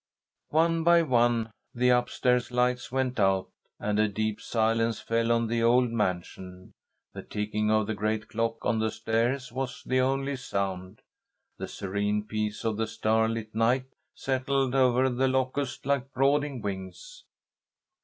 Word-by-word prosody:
One 165 +1 +2
by 170 0 +5
one 120 -5 +2 0.2
the 125 +1 +3
up 125 0 +2
stairs 125 0 +1
lights 125 -1 0
went 130 -2 -1
out, 95 -1 +2 0.3
and 105 0 -1
a 110 - +4
deep 110 +1 -2
silence 115 0 +1
fell 115 0 0
on 115 0 +2
the 115 +1 -1
old 120 +1 +4
mansion. 90 -3 -4 0.4
The - - -7
ticking 105 +1 -2
of 110 -1 +3
the 110 - -2
great 105 +1 -2
clock 115 0 -2
on 115 -2 +1
the 110 0 +1
stairs 115 +4 -1
was 130 -1 -4
the 130 0 +1
only 135 +1 0
sound. 100 -4 -4 0.6
The - - -4
serene 100 +2 -2
peace 105 0 -3
of 110 -2 0
the 110 0 -1
starlit 110 0 0
night 125 +4 +1 0.2
settled 135 0 0
over 130 -1 +3
The 130 +1 +1
Locusts 130 +1 -1
like 140 -1 0
brooding 140 -1 +1
wings. 100 - -7
115 Hz, 150 wpm, -28 LUFS, 110-130 Hz, 0.6 s, by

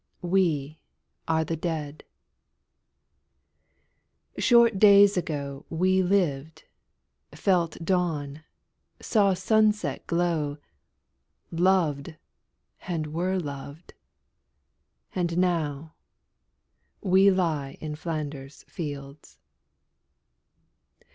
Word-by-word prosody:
We 165 -5 0 0.5
are 160 -1 +1
the 165 - -2
Dead. 155 -3 -4 2.4
Short 235 -4 +4
days 200 -1 +7
ago 145 -5 -4
We 185 +3 +2
lived, 160 -6 -1 0.7
felt 175 -5 +1
dawn, 155 -5 -1 0.6
saw 200 -4 +2
sunset 215 +1 +1
glow, 170 -4 -1 0.9
Loved, 165 -4 +1 0.7
and 155 -4 -3
were 185 +3 -1
loved, 145 0 -7 1.2
and 175 -2 -1
now 160 -4 -1 1.1
we 190 +1 +5
lie 160 -8 -1
In 155 -1 -5
Flanders 150 -4 -6
fields. 145 -2 -8
165 Hz, 70 wpm, -26 LUFS, 150-185 Hz, 2.4 s, days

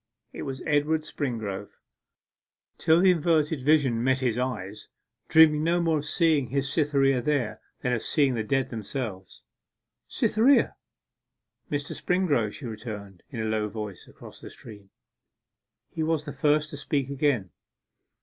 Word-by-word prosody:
It - - -7
was 135 -1 -5
Edward 150 +1 +2
Springrove 110 -10 -4 1.1
till 160 +2 +4
the 190 0 +6
inverted 160 -3 +1
vision 135 -5 +3
met 130 +1 +3
his 125 -4 0
eye, 120 -7 -2 0.6
dreaming 155 -1 +6
no 170 +2 +2
more 165 -2 +1
of 145 - -6
seeing 155 -6 +2
his 135 +3 -1
Cytherea 140 -4 +2
there 135 -4 -1 0.2
than 125 -2 0
of 115 - -1
seeing 140 -4 +2
the 115 - -1
dead 135 +5 -1
themselves. 110 - -6 0.6
'Cytherea!' 250 +6 +3 0.9
'Mr. 145 -1 -3
Springrove,' 150 - 0
she 140 - -9
returned, 105 -5 -7
in 115 - -5
a - - -2
low 110 -1 -1
voice, 105 -3 -7
across - - -13
the - - -9
stream. 105 -3 -12 1.0
He 160 - -4
was 155 -1 0
the 145 - -5
first 150 0 +1
to 145 - -6
speak 140 -2 -2
again. 135 - 0
135 Hz, 145 wpm, -26 LUFS, 115-155 Hz, 1.1 s, the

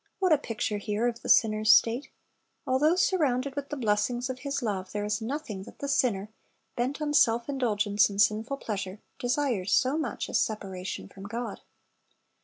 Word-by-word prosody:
What 370 -4 +3
a - - +5
picture 220 -5 -3
here 210 +3 -1
of 235 -1 -3
the - - -7
sinner's 215 -1 +5
state! 235 +5 +4 0.6
Although 295 +6 +3
surrounded 280 -8 +1
with 285 -1 -4
the 295 - -4
blessings 240 +2 0
of 255 - -8
His 280 -1 -3
love, 195 -4 -3
there 205 0 -2
is 210 +1 -1
nothing 230 -5 -4
that - - -13
the 280 - -4
sinner, 220 -7 +1 0.4
bent 255 +5 -1
on 295 -1 -1
self 235 -5 +4
indulgence 210 -7 +2
and 200 0 -6
sinful 220 +6 +2
pleasure, 195 -4 -4 0.2
desires 245 -7 0
so 270 +4 +3
much 265 -8 -3
as - - +1
separation 195 -4 -4
from 195 0 -12
God. 235 +4 -5
235 Hz, 175 wpm, -28 LUFS, 210-275 Hz, 0.6 s, a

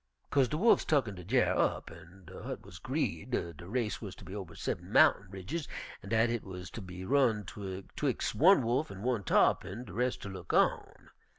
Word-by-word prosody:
"Co'se 135 -3 +4
de 150 - -2
wolfs 225 +7 +5
tucken 135 -9 +1
de 90 -2 -9
dyar' 125 +8 +2
up, - - 0
an' 90 +1 -15 0.2
hit - - -6
wuz - - -11
'greed - - -2 0.3
de 85 - -9
race 115 0 -2
wuz 100 -5 -6
ter - - -12
be 95 - -8
over 100 -5 -7
seben - - -4
mountain 100 - +5
ridges, 100 - -5 0.3
an' - - -10
dat 115 +1 +3
hit 120 -2 -2
wuz 90 -1 -8
ter 115 - -7
be 90 0 -8
run 120 -4 +3
'twix' 95 0 -3
one 180 -1 +6
wolf 125 +7 0
an' 95 +1 -8
one 120 -4 0
tarr'pin, 100 +5 +2
de 95 - -10
res' 125 +4 0
ter 100 - -8
look 95 - -6
on. - - +1
105 Hz, 200 wpm, -31 LUFS, 95-125 Hz, 0.3 s, one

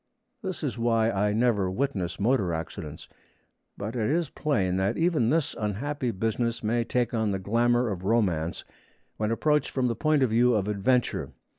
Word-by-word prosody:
This 190 -5 -5
is 125 -5 -2
why 115 -1 +2
I 105 0 +1
never 105 -4 +2
witness 95 -6 -2
motor 105 -4 +2
accidents. 80 -2 -7 0.7
But 105 +4 -5
it 110 -1 0
is 165 0 0
plain 95 -12 0
that 95 +1 0
even 160 -9 +2
this 160 +1 0
unhappy 125 +6 -2
business 115 +3 -1
may 115 +2 +1
take 120 0 -1
on 110 -2 +1
the 100 - 0
glamour 120 +5 +2
of 95 -4 -4
romance 95 -7 0 0.5
when 105 0 -1
approached 150 +5 +1
from 130 -2 -1
the 120 -2 0
point 155 -1 +2
of 125 - +1
view 120 +1 +4
of 100 -2 0
adventure. 105 +4 0
115 Hz, 170 wpm, -27 LUFS, 100-125 Hz, 0.7 s, view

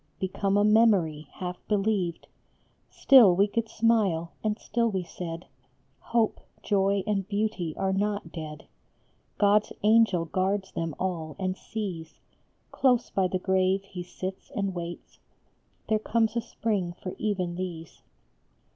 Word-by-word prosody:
Become 195 +1 0
a 205 - +4
memory, 200 -9 +3
half 180 -1 -5
believed; 200 -4 0 0.6
Still 235 -10 +6
we 195 +3 +4
could 220 +2 -2
smile, 210 -8 +1
and 215 -1 0
still 235 +1 0
we 190 -3 -2
said, 170 -1 -7 0.3
" - - -41
Hope, 230 -2 +2 0.2
joy, 195 -1 +2
and 195 -3 -1
beauty 205 -6 -2
are 190 0 0
not 200 -3 -1
dead; 155 -2 -7 0.7
God 205 0 +5
s - - -11
angel 210 -5 +4
guards 190 +3 -1
them 165 -2 -3
all 165 -4 -3
and 185 -1 -2
sees 185 -8 -6 0.5
Close 250 -3 +2
by 190 -1 +2
the 185 - -1
grave 190 +1 +1
he 190 -2 -8
sits 185 +2 -7
and 200 -3 -1
waits 175 -1 -7 0.7
There 215 -1 +2
comes 225 0 +1
a 235 - +1
spring 200 -7 -2
for 185 +1 -7
even 185 -5 -1
these." 175 -3 -6
195 Hz, 140 wpm, -27 LUFS, 175-210 Hz, 0.7 s, Still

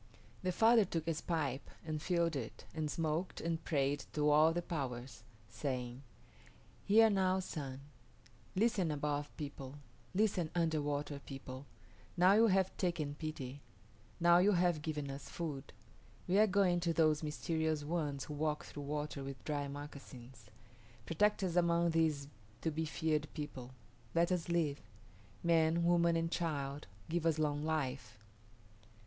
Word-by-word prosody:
The 185 - 0
father 225 +4 +6
took 165 -4 -3
his 165 -1 -1
pipe 145 -6 -2 0.2
and 155 -1 -3
filled 170 -1 +1
it, 120 -5 -5
and 155 -1 -2
smoked 160 +3 -1
and 165 0 -2
prayed 140 -2 0
to 150 0 +3
all 155 +2 +6
the 175 +1 -2
powers, 130 -6 -4 0.3
saying, 125 +1 -4 0.8
"Hear 225 +2 +7
now, 190 -2 +2
Sun; 140 -7 -5 0.7
listen, 200 -4 +2
Above 145 -1 -1
People; 140 -2 -6 0.4
listen, 190 -5 +2
Underwater 145 -3 0
People; 135 0 -8 0.5
now 180 +2 +6
you 225 +2 +6
have 190 -2 +2
taken 165 -6 -1
pity; 145 -3 -6 0.6
now 170 0 +6
you 200 +3 +5
have 175 -3 +2
given 150 -3 -3
us 135 +1 -8
food. 150 -6 -5 0.6
We 190 +3 +4
are 215 - +6
going 185 -3 +3
to 170 -1 0
those 155 -1 +3
mysterious 160 0 -1
ones 145 -3 -2
who 150 - -7
walk 150 0 -1
through 145 - -8
water 150 0 -3
with 135 -2 -7
dry 145 -2 -1
moccasins. 135 -5 -10 0.6
Protect 210 +5 +2
us 180 -2 -1
among 170 -1 +3
these 155 -4 +1 0.3
to 160 - 0
be 160 +1 -1
feared 155 -1 0
people. 135 -5 -6 0.5
Let 170 +2 +3
us 175 -2 -1
live. 160 -4 +1 0.6
Man, 165 0 +3
woman, 170 -1 +4
and 165 0 0
child, 145 -4 -2 0.2
give 170 0 -1
us 165 -2 +2
long 150 -1 0
life." 135 -8 -2
155 Hz, 145 wpm, -35 LUFS, 145-170 Hz, 0.8 s, Hear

